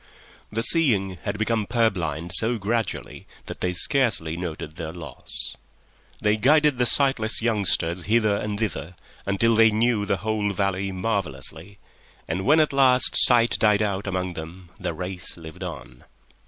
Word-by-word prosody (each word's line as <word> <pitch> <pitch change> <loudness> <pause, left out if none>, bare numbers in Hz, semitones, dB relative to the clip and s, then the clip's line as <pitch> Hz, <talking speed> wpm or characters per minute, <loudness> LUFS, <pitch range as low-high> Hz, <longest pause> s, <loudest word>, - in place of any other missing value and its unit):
The 115 +2 -2
seeing 105 - +3
had 100 0 -3
become 110 0 -1
purblind 90 -8 -1
so 115 +5 +4
gradually 110 0 -4 0.2
that - - -9
they 90 - 0
scarcely 100 - +1
noticed 80 -3 -6
their 80 -2 -5
loss. 85 0 -5 0.6
They 105 +1 +1
guided 150 +3 +3
the 125 - +3
sightless 125 -6 +1
youngsters 95 -6 0
hither 110 -2 +2
and 105 0 -3
thither 90 -6 -4 0.3
until 105 +4 +2
they 115 0 +6
knew 110 -1 0
the 100 - 0
whole 105 0 -2
valley 100 0 -1
marvellously, 95 -2 -4 0.5
and 95 - -3
when 155 +3 +5
at 155 -2 +2
last 130 -2 +5
sight 120 -1 +4
died 105 -1 +3
out 100 -1 -3
among 95 -1 -3
them 85 +2 -10
the 80 - -4
race 90 +1 -5
lived 80 -2 -11
on. 60 - -8
100 Hz, 150 wpm, -24 LUFS, 90-115 Hz, 0.6 s, they